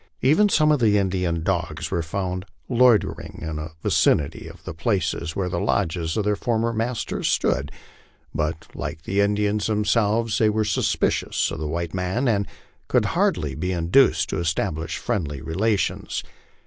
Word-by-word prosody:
Even 160 Hz, +10 st, +5 dB
some 155 Hz, -4 st, +4 dB
of 150 Hz, -, +3 dB
the 105 Hz, -3 st, +4 dB
Indian 90 Hz, -4 st, 0 dB
dogs 80 Hz, -3 st, -2 dB
were 85 Hz, -3 st, 0 dB
found 90 Hz, +2 st, -3 dB, 0.2 s
loiter 125 Hz, -3 st, +3 dB
ing -, -, -10 dB
in 80 Hz, -1 st, -4 dB
the 75 Hz, +1 st, -5 dB
vicinity 70 Hz, -2 st, +2 dB
of -, -, -12 dB
the -, -, -6 dB
places 85 Hz, -2 st, -1 dB
where 95 Hz, -2 st, -1 dB
the 90 Hz, -1 st, -2 dB
lodges 80 Hz, +1 st, 0 dB
of 105 Hz, -, +1 dB
their 105 Hz, 0 st, +2 dB
former 115 Hz, +1 st, 0 dB
masters 115 Hz, +1 st, -2 dB
stood; 70 Hz, +2 st, +1 dB, 0.6 s
but, 75 Hz, +1 st, -2 dB
like 80 Hz, -, -5 dB
the 100 Hz, +2 st, +1 dB
Indians 105 Hz, +1 st, +1 dB
themselves, 110 Hz, +1 st, +1 dB
they 110 Hz, -, +4 dB
were 110 Hz, 0 st, +1 dB
suspicious 105 Hz, -, 0 dB
of -, -, -5 dB
the 80 Hz, -, -3 dB
white 85 Hz, +2 st, -3 dB
man, 95 Hz, +8 st, -1 dB
and 100 Hz, -4 st, +1 dB, 0.4 s
could -, -, +2 dB
hardly 70 Hz, -3 st, +1 dB
be 90 Hz, +7 st, -2 dB
induced 90 Hz, +10 st, +3 dB
to -, -, -1 dB
establish 80 Hz, -1 st, -1 dB
friendly 80 Hz, -, -2 dB
relations. 100 Hz, -, -1 dB
95 Hz, 160 wpm, -23 LUFS, 80-110 Hz, 0.6 s, Even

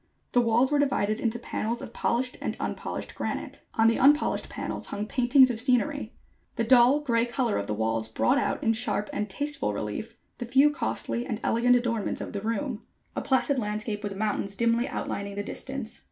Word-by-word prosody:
The 245 Hz, -, +4 dB
walls 240 Hz, +3 st, +3 dB
were 295 Hz, -, +3 dB
divided 215 Hz, -7 st, +1 dB
into 230 Hz, 0 st, 0 dB
panels 235 Hz, 0 st, -3 dB
of 230 Hz, -, -8 dB
polished 250 Hz, +2 st, 0 dB
and -, -, -3 dB
unpolished -, -, -4 dB
granite. -, -, -4 dB
On 225 Hz, 0 st, +4 dB
the 230 Hz, -, +3 dB
unpolished 290 Hz, +3 st, +3 dB
panels -, -, -5 dB
hung 205 Hz, -, -3 dB
paintings 255 Hz, +2 st, +5 dB
of 225 Hz, -, -2 dB
scenery. 255 Hz, 0 st, +1 dB, 0.4 s
The 230 Hz, -, 0 dB
dull, 250 Hz, +4 st, +5 dB
gray 235 Hz, -5 st, +2 dB
color 240 Hz, -2 st, 0 dB
of 100 Hz, -, -4 dB
the 105 Hz, -, -1 dB
walls 110 Hz, +1 st, -1 dB
brought 250 Hz, -, +2 dB
out -, -, -1 dB
in 225 Hz, -, +3 dB
sharp 220 Hz, -2 st, -1 dB
and 210 Hz, 0 st, -2 dB
tasteful 285 Hz, -, -2 dB
relief 105 Hz, -, -5 dB, 0.2 s
the 240 Hz, -, -3 dB
few 270 Hz, +4 st, +5 dB
costly 240 Hz, -4 st, -2 dB
and 225 Hz, -5 st, -3 dB
elegant 245 Hz, +2 st, +3 dB
adornments 235 Hz, -3 st, -1 dB
of -, -, -6 dB
the 200 Hz, -, -3 dB
room: 230 Hz, +2 st, -2 dB, 0.3 s
a -, -, -1 dB
placid 265 Hz, 0 st, +1 dB
landscape 210 Hz, -1 st, -3 dB
with 205 Hz, -2 st, -5 dB
mountains 200 Hz, -1 st, -1 dB
dimly 235 Hz, +3 st, +2 dB
outlining 200 Hz, -6 st, -4 dB
the 205 Hz, -, -3 dB
distance. 265 Hz, +1 st, -6 dB
235 Hz, 190 wpm, -27 LUFS, 210-255 Hz, 0.4 s, paintings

